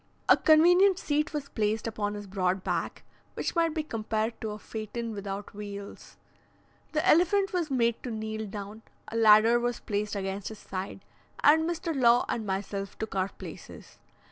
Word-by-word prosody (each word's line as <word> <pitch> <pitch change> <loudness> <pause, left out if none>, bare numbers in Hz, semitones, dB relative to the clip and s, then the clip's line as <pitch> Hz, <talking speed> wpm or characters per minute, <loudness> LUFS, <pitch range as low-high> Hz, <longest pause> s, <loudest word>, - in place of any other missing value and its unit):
A - - +8
convenient 355 +4 +5
seat 300 -4 -1
was 290 -2 -4
placed 215 0 -1
upon 210 -2 -2
his 205 0 -7
broad 190 -1 -1
back, - - -3 0.3
which - - -3
might 330 -1 +2
be 315 - -1
compared 220 -3 -2
to 220 - -3
a 210 - -5
phaeton 220 +2 -5
without 200 0 -6
wheels. 200 -1 -9 0.8
The 310 0 0
elephant 385 +4 +4
was 345 -4 -1
made 235 -4 +1
to 255 - -5
kneel 220 -1 -4
down, 205 +2 -7 0.3
a - - -7
ladder 225 +1 +6
was 240 -1 -2
placed 210 0 -3
against 195 0 -3
his 220 - -7
side, 190 0 -7 0.4
and 320 +3 +5
Mr. 335 -1 -3
Law 240 -2 +4
and 220 -3 -3
myself 195 0 -4
took 220 - -5
our 190 0 0
places. - - -11
220 Hz, 170 wpm, -28 LUFS, 205-295 Hz, 0.8 s, A